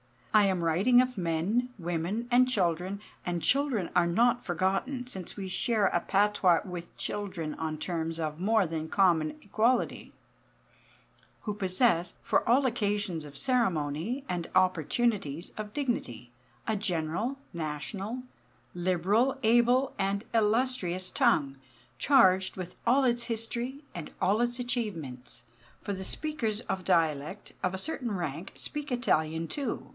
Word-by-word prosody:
I 210 -1 +6
am 185 -3 +1
writing 195 +10 +5
of 255 -2 -2
men, 185 +8 0
women, 175 +6 -2
and 250 +1 +6
children 185 -2 0 0.2
(and 175 -1 -1
children 275 -9 +2
are 175 -1 +4
not 240 +7 +3
forgotten, 195 - -1
since 190 -8 -5
we 195 -2 -5
share 215 +1 +2
a - - +1
patois 195 -2 +3
with 180 -3 -8
children 185 -7 -3
on 155 -1 -3
terms 165 -1 -3
of 155 -1 -3
more 215 +2 +3
than 160 -1 -3
common 165 -4 +3
equality) 230 +4 0 1.3
who 210 - -3
possess, 185 -2 +1
for - - +1
all 260 +4 +4
occasions 205 -8 -1
of 145 -1 -11
ceremony 200 - 0
and 175 -2 -3
opportunities 185 - +1
of 210 -1 -6
dignity, 180 - -3 0.3
a 220 -1 0
general, 190 - -1 0.2
national, 190 - -4 0.5
liberal, 185 - +1
able, 240 +4 +4
and 200 +1 0
illustrious 215 -5 +1
tongue, 155 - +2 0.4
charged 190 -9 +4
with 180 -1 -7
all 270 +3 +5
its 240 -2 +2
history 235 +4 -3
and 170 -3 -7
all 200 +4 +3
its 240 +1 0
achievements; 165 - -4 0.4
for - - -4
the 190 -1 -4
speakers 235 -9 -2
of 190 -5 -4
dialect, 165 +1 0
of 185 - 0
a - - -2
certain 245 0 -3
rank, 170 -1 -4
speak 295 -1 -5
Italian, 160 -9 +1
too. 275 - -4
195 Hz, 135 wpm, -29 LUFS, 170-240 Hz, 1.3 s, I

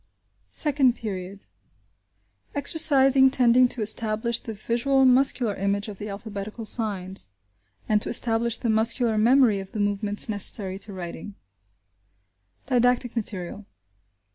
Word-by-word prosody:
SECOND 275 -5 +1
PERIOD: 195 -3 -7 1.1
EXERCISES 275 -3 +4
TENDING 250 -1 +4
TO 240 -2 -2
ESTABLISH 220 +2 0
THE 225 - -8
VISUAL 240 +5 +1
MUSCULAR 255 -3 +3
IMAGE 200 +2 -2
OF 200 - -10
THE 210 - -6
ALPHABETICAL 210 +2 -7
SIGNS: 195 - -3 0.6
AND 210 -1 +1
TO - - -1
ESTABLISH 235 0 +3
THE 235 - -1
MUSCULAR 225 0 0
MEMORY 235 -2 +4
OF 195 0 -10
THE 215 - -4
MOVEMENTS 205 0 0
NECESSARY 200 -2 -2
TO 205 0 -2
WRITING 185 +2 -8 1.3
Didactic 245 -1 +1
Material. 200 -2 -5
220 Hz, 115 wpm, -24 LUFS, 205-245 Hz, 1.3 s, EXERCISES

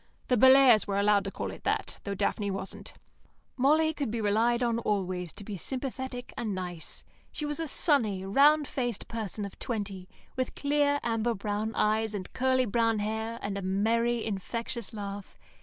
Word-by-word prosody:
(The 250 - +4
Bellairs 260 -2 +7
were 200 -1 -1
allowed 200 -1 +3
to 195 - -3
call - - -4
it - - -11
that, - - -1
though 200 -1 -2
Daphne 205 +1 0
wasn't.) 195 0 -6 0.6
Molly 310 +5 +3
could 285 -5 -2
be 230 +1 -2
relied 225 +4 +2
on 235 -1 +1
always 185 -5 -1
to - - -8
be 205 -1 -6
sympathetic 260 - -4
and 215 -4 -2
nice. 180 -3 -6 0.3
She 300 - -4
was 295 +1 -3
a 325 - -2
sunny, 225 - +1
round 290 +8 +5
faced 245 -5 -3
person 215 -2 -4
of 200 - -10
twenty, 200 -5 -4 0.3
with 255 -1 -2
clear, 285 0 +2
amber 230 0 0
brown 210 +2 -3
eyes 215 0 +1
and 185 -2 -6
curly 260 0 +2
brown 230 0 +2
hair, 220 +2 -2
and 200 -1 -2
a - - -5
merry 225 +5 +1
infectious 230 +2 -4
laugh. 200 -2 -7
220 Hz, 175 wpm, -29 LUFS, 200-255 Hz, 0.6 s, Bellairs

